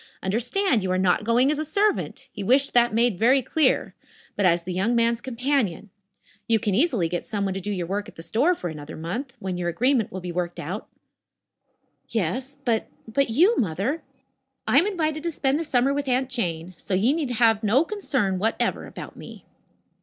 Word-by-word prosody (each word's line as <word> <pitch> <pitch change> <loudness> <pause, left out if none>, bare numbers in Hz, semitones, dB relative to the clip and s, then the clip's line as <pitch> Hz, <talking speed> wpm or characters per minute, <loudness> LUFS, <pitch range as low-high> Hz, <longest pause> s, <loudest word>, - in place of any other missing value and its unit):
Understand, 245 - +1
you 190 - -2
are 185 - +1
not 185 +1 +2
going 240 +5 +3
as 300 - -1
a - - 0
servant 400 +7 0
he 200 - -5
wished 265 +7 +3
that 240 0 +4
made 230 -3 +2
very 255 +4 +4
clear 300 +2 +1 0.4
but 200 -3 +3
as 170 -1 +2
the 180 +1 -4
young 200 +7 +1
man's 235 0 +2
companion. 235 - -1 0.6
You 230 - +4
can 210 -2 -1
easily 235 - +2
get 175 +1 -3
someone 200 -3 -2
to 195 - -4
do 205 - -5
your 185 -4 -2
work 200 +4 -3
at - - -17
the 165 - -9
store 285 - +2
for 180 - -5
another 150 -2 -8
month, 235 - -5
when 190 -5 -4
your 175 -1 -1
agreement 245 +4 +1
will 185 - -5
be 180 -1 -5
worked 175 0 -3
out." 185 +8 -5 1.2
"Yes 250 - -2
but 230 -3 +1 0.2
but 275 +4 +1
you, 350 - +4
Mother?" 205 - -1 0.7
"I - - +6
am 360 - +2
invited 315 -6 -1
to 340 - -2
spend 285 -2 0
the - - -1
summer 270 -2 +2
with 285 0 -2
Aunt 260 +1 0
Jane, 175 -7 -2
so 190 - -2
you 220 +9 +3
need 305 -4 -2
have 225 -3 +3
no 230 +8 +4
concern 270 - -1
whatever 225 +3 -1
about - - -9
me." - - -11
230 Hz, 200 wpm, -24 LUFS, 190-275 Hz, 1.2 s, I